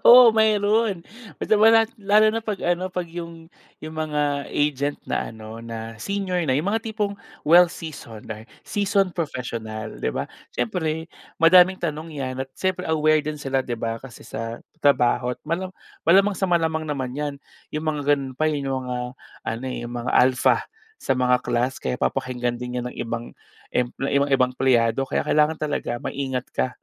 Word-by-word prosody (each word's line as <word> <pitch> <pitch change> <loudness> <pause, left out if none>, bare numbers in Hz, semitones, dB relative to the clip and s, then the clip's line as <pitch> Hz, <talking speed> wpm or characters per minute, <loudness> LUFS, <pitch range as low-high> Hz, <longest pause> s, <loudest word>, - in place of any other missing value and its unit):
Oo, 245 -1 +10
meron, 215 -3 +2 0.3
basta - - +2
manat 225 +1 +6
lalo 210 +2 +5
na 225 - -1
pag 210 -3 -3
ano, 175 +1 +1
pag 180 -1 -3
'yung 170 -1 -8 0.4
'yung 155 +1 -7
mga 150 -2 -1
agent 145 -1 0
na - - -1
ano 110 0 -9
na 115 0 -6
senior 190 - -1
na, 130 - +2
'yung 155 - -1
mga 225 0 0
tipong 210 -2 -1 0.3
well-seasoned 160 -9 +2
na 110 0 -6 0.2
seasoned 200 -2 +1
professional, 115 -8 -4
di - - 0
ba, - - -3 0.2
siyempre, 160 +6 -2 0.3
madaming 180 +3 +7
tanong 160 0 -4
'yan 130 -3 -3
at 135 - -10
siyempre 185 -1 -1
aware 155 -1 +3
din 150 0 -4
sila, 135 -1 0
di 120 -2 -4
ba, 115 0 -3
kasi 130 -3 -11
sa 115 +1 -5 0.2
trabaho. 125 -3 +3
Malam 180 +4 -2 0.3
malamang 195 +4 +5
sa 190 - 0
malamang 160 -2 +2
naman 130 -4 -3
’yan 145 0 -2 0.4
’yung 155 +1 -3
mga 145 -2 +2
gano’n 135 -2 -5
pa, 155 +4 +1
eh, 150 - -1
’yung 135 -2 -2
mga 125 - -2 0.5
ano, 115 +3 -3
eh, - - -4
’yung 120 - -7
mga 120 +1 -3
alpha 130 0 +4 0.4
sa - - 0
mga 125 -1 +3
class. 125 +3 0
Kaya - - -2
papakinggan 125 -1 -1
din 125 0 -4
’yun - - -6
ng - - -14
ibang 115 0 -4 0.4
emple 125 +2 -1
'yung 140 - +3
mga 140 - +2
ibang 130 -1 +3
empleyado. 125 0 +2
Kaya - - 0
kailangan 150 +1 +2
talaga 145 -5 -2
maingat 130 -2 -3
ka - - 0
145 Hz, 175 wpm, -24 LUFS, 125-175 Hz, 0.5 s, Oo